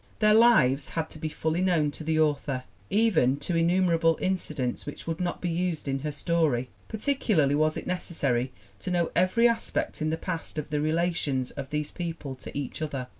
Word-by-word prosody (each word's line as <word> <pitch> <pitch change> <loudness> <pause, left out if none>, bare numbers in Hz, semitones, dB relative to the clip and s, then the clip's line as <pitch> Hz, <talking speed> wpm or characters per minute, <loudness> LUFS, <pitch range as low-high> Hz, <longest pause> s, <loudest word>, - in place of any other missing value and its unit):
Their 215 -1 +4
lives 215 - +5
had 160 -1 -3
to 155 - -8
be 155 0 -2
fully 160 +3 -1
known 170 -6 +2
to 155 - -7
the 160 0 +1
author, 145 -4 +1 0.3
even 175 - +3
to 170 +4 -1
innumerable 165 -1 +3
incidents 155 -9 -2
which 145 - -7
would 165 +1 -3
not 175 -1 -2
be 180 - -1
used 170 -3 -2
in 135 0 0
her 150 +2 -3
story. 145 -5 0 0.2
Particularly 215 - +1
was 155 +1 +2
it - - -5
necessary 140 -8 -1 0.3
to - - -5
know 175 -2 +1
every 185 +7 +4
aspect 230 -7 -1
in 155 - +1
the 160 - -1
past 165 -3 -5
of 150 0 -4
the 150 -1 0
re 155 +1 +1
lations 160 -6 0
of 140 -2 -7
these 150 0 -2
people 165 -5 -5
to - - -8
each 145 +2 -4
other. 135 -5 -3
160 Hz, 195 wpm, -27 LUFS, 145-180 Hz, 0.3 s, lives